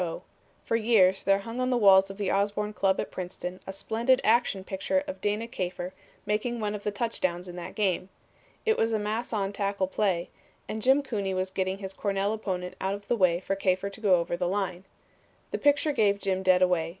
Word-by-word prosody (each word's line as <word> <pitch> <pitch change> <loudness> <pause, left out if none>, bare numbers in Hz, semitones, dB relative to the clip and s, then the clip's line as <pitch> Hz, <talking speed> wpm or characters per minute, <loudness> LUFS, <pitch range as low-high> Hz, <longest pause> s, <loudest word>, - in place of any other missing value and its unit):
For - - 0
years 210 -5 +4
there 195 0 +3
hung 230 +5 -6
on 255 - +1
the 250 - +2
walls 195 -3 +6
of 195 - -8
the 205 -2 -1
Osborn 205 +1 0
Club 195 -2 +1
at - - -3
Princeton 180 0 -6
a - - -3
splendid 230 +6 +1
action 220 -4 +2
picture 195 +10 -1
of 285 -1 -7
Dana 210 +2 -1
Kafer 180 -5 -4 0.3
making 230 +3 -1
one 210 -1 -1
of 210 - -5
the 210 - -1
touchdowns 185 -5 -2
in 175 - -8
that 175 - -7
game. 190 -3 0 0.6
It 445 0 +2
was 225 0 +2
a - - +3
mass 215 +3 -3
on 200 -3 -1
tackle 200 -1 0
play, 185 -3 -1 0.4
and 220 - -4
Jim 265 +4 +4
Cooney 200 -7 -2
was 185 0 -2
getting 190 0 -1
his 195 -1 -6
Cornell 200 +1 -1
opponent 185 -4 -4
out 190 +1 0
of 200 0 -12
the 240 - +3
way 180 -4 +3
for 195 - -1
Kafer 195 0 0
to 210 - -11
go 200 -4 +5
over 170 0 -1
the 175 0 -1
line. 185 -1 -2 0.7
The - - -2
picture 290 +1 +3
gave 205 -7 +3
Jim 190 -2 -1
dead 185 -1 +4
away. 175 -3 +2
200 Hz, 210 wpm, -28 LUFS, 185-220 Hz, 0.7 s, walls